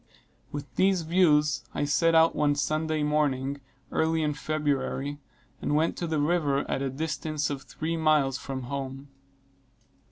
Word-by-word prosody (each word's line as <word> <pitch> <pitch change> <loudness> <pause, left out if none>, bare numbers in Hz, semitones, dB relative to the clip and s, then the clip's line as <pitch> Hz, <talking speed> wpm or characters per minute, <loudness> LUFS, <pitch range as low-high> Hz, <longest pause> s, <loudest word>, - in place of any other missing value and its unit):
With 145 -1 -5
these 190 -2 +3
views, 155 -3 +3
I - - 0
set 165 +3 +3
out 160 0 +5
one 145 -1 +2
Sunday 155 +2 0
morning, 140 -2 0 0.3
early 160 0 +1
in 150 -1 0
February, 145 -1 -2 0.4
and 150 - 0
went 160 +2 +2
to 170 - -2
the 160 -1 -1
river 145 -3 +1
at - - -1
a 135 - -1
distance 155 +1 -2
of 140 -1 -4
three 160 +4 -4
miles 150 -4 +2
from 130 -2 -5
home. 135 +1 -5
150 Hz, 150 wpm, -27 LUFS, 140-160 Hz, 0.4 s, out